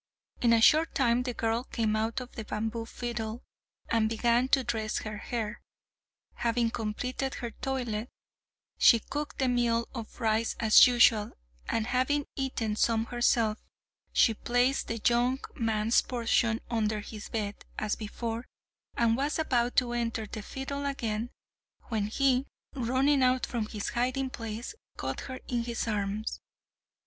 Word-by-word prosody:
In 235 - +4
a 230 -1 +5
short 315 +7 +5
time 245 -4 +3
the 250 -1 -3
girl 225 +1 0
came 220 -4 -1
out 220 +3 -1
of 250 - -9
the 225 - -5
bamboo 225 +2 -3
fiddle, 235 -1 -4 0.4
and 225 -1 +2
began 235 +2 +2
to 265 0 +3
dress 220 -3 -2
her 215 -1 -5
hair. 225 -2 -4 0.8
Having 235 0 +1
completed 250 +5 -3
her 235 -2 -5
toilet, 245 -3 -3 0.7
she 235 - +8
cooked 295 +6 -5
the 265 - +1
meal 235 -2 +1
of 230 -2 -8
rice 220 -1 +1
as 220 +1 +8
usual, 235 -3 +4 0.4
and 225 - 0
having 260 +4 +1
eaten 250 -6 -2
some 225 0 +2
herself, 230 -2 +1 0.5
she 225 - +4
placed 245 +4 +1
the 230 - -3
young 245 +2 +3 0.2
man's 225 -1 +2
portion 230 -1 +1
under 215 -2 0
his 215 0 -8
bed, 205 -2 -3
as 215 -1 -1
before, 225 +2 -5 0.5
and 230 -1 +3
was 285 +3 0
about 245 -6 +1
to 245 -2 +2
enter 230 -2 -1
the 215 +1 -7
fiddle 275 +5 -5
again, 230 -4 -2 0.6
when 215 -4 0
he, 265 +3 +2 0.3
running 265 +2 +2
out 255 0 +3
from 230 -3 -3
his 210 -2 -4
hiding 255 +2 -1
place, 225 - -5 0.2
caught - - -3
her 260 -1 -6
in 240 -2 -1
his 235 -1 -3
arms. 210 0 -2
235 Hz, 150 wpm, -29 LUFS, 220-250 Hz, 0.8 s, she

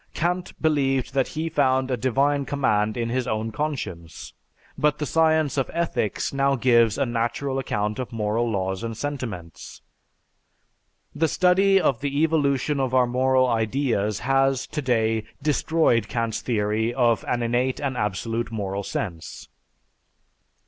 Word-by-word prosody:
Kant 175 +2 -2
believed 135 -5 +1
that 135 -2 +1
he 160 +2 -3
found 130 -4 +1
a - - +2
divine 135 +4 +1
command 110 -7 0
in 115 -1 -1
his 125 +1 -1
own 110 0 -2
conscience; 105 - -5 0.4
but 150 0 +1
the 150 - -2
science 160 -2 +2
of 135 - -1
ethics 170 -12 -1
now 140 0 +2
gives 115 -3 +3
a - - +1
natural 120 +3 -2
account 105 -4 -2
of 130 -1 -4
moral 115 +1 -1
laws 95 -1 -2
and 115 -1 -4
sentiments. 115 - -6 1.3
The 160 +2 +1
study 190 +4 +4
of 135 -10 +1
the 140 +2 0
evolution 145 -2 +1
of 130 -1 0
our 125 -1 +5
moral 130 +1 +2
ideas 110 -2 0
has, 135 0 +2
today, 115 -6 0 0.2
destroyed 150 -3 +1
Kant's 115 -2 -2
theory 110 0 0
of 120 -3 +2
an 120 -1 0
innate 125 +2 0
and 135 -3 -2
absolute 115 +2 -2
moral 100 -3 -3
sense. 85 -4 -6
130 Hz, 140 wpm, -24 LUFS, 110-140 Hz, 1.3 s, our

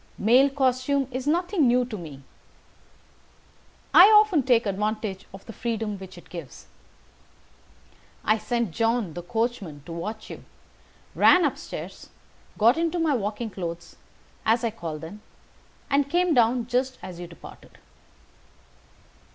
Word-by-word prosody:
Male 250 +6 +4
costume 265 0 0
is 255 +2 -5
nothing 345 -1 +2
new 245 +1 +3
to 240 -3 -7
me. 150 -7 -9 1.7
I 360 - +10
often 425 -7 +5
take 245 -3 +2
advantage 210 0 -3
of 195 0 -12
the 225 - -9
freedom 220 -3 -3
which 185 -1 -11
it 175 - -14
gives. 165 -8 -9 1.6
I 215 +1 +3
sent 235 -5 -2
John, 225 -2 0
the 175 - -6
coachman, 195 - -3
to - - -9
watch 215 +6 -6
you, - - -9 0.7
ran 360 -2 +5
up 290 - 0
stairs, - - -8 0.5
got 230 +6 +4
into 335 +1 0
my 325 -3 +1
walking 215 -1 -3
clothes, 170 -3 -7 0.5
as 230 +2 +2
I 230 - 0
call 170 -8 -6
them, 165 +7 -10 0.7
and 280 0 +1
came 355 +1 +2
down 240 -1 +3
just 255 +2 -1
as 175 -2 -8
you 175 - -7
departed. 170 - -14
230 Hz, 135 wpm, -25 LUFS, 190-265 Hz, 1.7 s, I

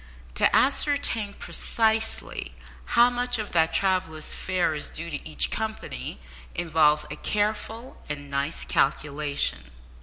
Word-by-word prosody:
To 60 - +3
ascertain 265 -6 +2
precisely 220 -1 0 0.4
how 240 +1 +7
much 245 0 +1
of 215 -1 -4
that 160 -1 +3
traveller's 185 -5 0
fare 185 -3 0
is 150 - -3
due 165 +1 -6
to 150 +1 -5
each 155 - 0
company 220 - -4 0.4
involves 155 -3 +3
a - - -3
careful 215 +6 -2
and 145 -1 -5
nice 140 +3 -2
calculation. 140 - 0
175 Hz, 120 wpm, -26 LUFS, 150-220 Hz, 0.4 s, how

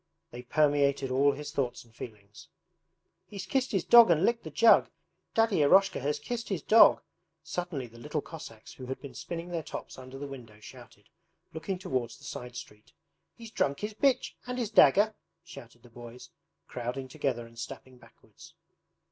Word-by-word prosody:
they 120 - -8
permeated 140 0 +1
all 140 +2 +4
his 150 +1 -7
thoughts 125 -3 -2
and 115 -1 -24
feelings. 105 -4 -11 0.8
'He's 195 -3 -7
kissed 260 +6 -1
his 195 -4 0
dog 235 -4 +8
and 170 +2 +3
licked 235 0 0
the - - -7
jug!... 230 - +5 0.5
Daddy 225 -3 +3
Eroshka 190 +6 +4
has 145 +2 -1
kissed 230 +10 -5
his 190 -7 -3
dog!' 225 +1 +6 0.4
suddenly 175 -7 -4
the 115 0 -15
little 150 +5 -3
Cossacks 140 -8 -10
who 130 - -10
had 130 - -5
been 140 - -10
spinning 170 0 -6
their 170 -2 -3
tops 145 - -8
under 130 +1 -10
the 145 - -6
window 120 -6 -11
shouted, 110 - -14 0.5
looking 180 +4 -4
towards 130 - -3
the - - -20
side 125 0 -7
street. 105 -2 -11 0.4
'He's 230 -2 -11
drunk 140 -9 -1
his 210 +1 -4
bitch, 265 +4 +1 0.2
and 250 0 -4
his 235 -4 -2
dagger!' 205 +3 +5 0.3
shouted 120 -8 -13
the 120 - -16
boys, 120 +1 -12 0.4
crowding 125 +2 -5
together 130 -4 -3
and 115 0 -14
stepping 125 +2 -9
backwards. - - -18
145 Hz, 175 wpm, -29 LUFS, 125-190 Hz, 0.8 s, dog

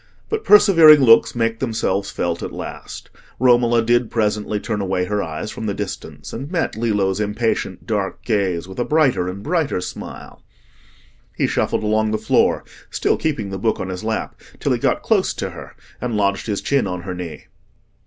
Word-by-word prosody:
But 440 -1 -2
persevering 165 -7 +8
looks 115 -2 +5
make 115 -1 0
themselves 100 -5 -1
felt 85 -1 -2
at - - -5
last. - - -8 0.3
Romola 120 -2 +4
did 120 0 +2
presently 105 -1 -1
turn 105 -1 -3
away 95 -1 -1
her 105 +2 -1
eyes 80 +5 -5
from 110 - -5
the 100 - -2
distance 100 -2 -7
and 135 +5 -6
met 170 - -1
Lillo's 105 -4 0
impatient 105 -2 -2
dark 100 -3 -3
gaze 95 -6 0
with 95 +5 -9
a - - +2
brighter 130 - +2
and 100 +2 -7
brighter 160 - 0
smile. 90 - -8 0.9
He - - +1
shuffled - - 0
along 110 0 +1
the 110 - 0
floor, 110 +1 +2 0.3
still - - +1
keeping 120 -11 -2
the 95 - -4
book 110 +3 0
on 95 - -4
his 90 +1 -5
lap, 110 0 -3 0.2
till - - -1
he - - -1
got - - 0
close - - +1
to - - -4
her - - -11 0.3
and 120 -3 -2
lodged 100 0 0
his 105 -2 -2
chin 140 -7 +1
on 90 -2 -4
her 95 0 -5
knee. 90 -3 -7
110 Hz, 185 wpm, -20 LUFS, 95-120 Hz, 0.9 s, persevering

